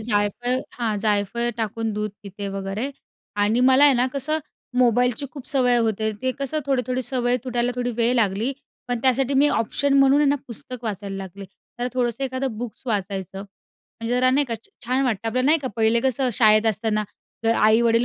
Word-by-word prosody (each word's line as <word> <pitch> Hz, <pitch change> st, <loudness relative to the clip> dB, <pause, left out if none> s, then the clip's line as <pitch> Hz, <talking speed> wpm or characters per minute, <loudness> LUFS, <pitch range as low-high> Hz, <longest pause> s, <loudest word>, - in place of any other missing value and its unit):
जायफळ, 220 Hz, +3 st, 0 dB
हां, 220 Hz, -4 st, -2 dB
जायफळ 210 Hz, +3 st, 0 dB
टाकून 225 Hz, 0 st, -2 dB
दूध 210 Hz, 0 st, -3 dB
पिते 200 Hz, 0 st, -6 dB
वगैरे. 195 Hz, +7 st, -4 dB, 0.5 s
आणि 210 Hz, +4 st, +2 dB
मला 270 Hz, +3 st, +6 dB
आहे 280 Hz, -2 st, +6 dB
ना, 245 Hz, +1 st, +3 dB
कसं 295 Hz, +3 st, -1 dB, 0.4 s
मोबाईलची 245 Hz, +2 st, +2 dB
खूप 280 Hz, -4 st, -9 dB
सवय 250 Hz, -3 st, +3 dB
होते. 220 Hz, -1 st, 0 dB
ते 260 Hz, -, +1 dB
कसं 275 Hz, +3 st, -1 dB
थोडी-थोडी 255 Hz, -1 st, 0 dB
सवय 245 Hz, 0 st, +1 dB
तुटायला 245 Hz, 0 st, 0 dB
थोडा 245 Hz, 0 st, -2 dB
वेळ 240 Hz, +1 st, +2 dB
लागली. 220 Hz, +3 st, +1 dB, 0.4 s
पण 245 Hz, -1 st, -1 dB
त्यासाठी 265 Hz, +1 st, +2 dB
मी 285 Hz, +2 st, +4 dB
ऑप्शन 275 Hz, +5 st, 0 dB
म्हणून, 275 Hz, +1 st, +5 dB
आहे 290 Hz, -, +3 dB
ना, 285 Hz, -, +2 dB
पुस्तक 240 Hz, +1 st, -5 dB
वाचायला 200 Hz, -2 st, -4 dB
लागले. 195 Hz, +1 st, -8 dB, 0.3 s
जरा 245 Hz, +1 st, -1 dB
थोडंसं 245 Hz, +1 st, -1 dB
एखादं 260 Hz, -3 st, -3 dB
बुक 240 Hz, -2 st, -5 dB
वाचायचं, 195 Hz, -3 st, -3 dB
म्हणजे 225 Hz, +3 st, -8 dB
जरा 255 Hz, +1 st, +3 dB
नाही 285 Hz, +2 st, +2 dB
का, 230 Hz, -, -1 dB, 0.3 s
छान 255 Hz, +3 st, +1 dB
वाटतं 225 Hz, -2 st, -1 dB
आपल्याला. 255 Hz, +4 st, 0 dB
नाही 320 Hz, +2 st, +5 dB
का, 260 Hz, -, -2 dB
पहिले 225 Hz, +1 st, +3 dB
कसं 260 Hz, 0 st, +1 dB
शाळेत 215 Hz, -1 st, +5 dB
असताना 215 Hz, 0 st, 0 dB, 0.4 s
जर 225 Hz, -, +4 dB
आई-वडील 230 Hz, +2 st, +4 dB
240 Hz, 180 wpm, -23 LUFS, 215-255 Hz, 0.5 s, मला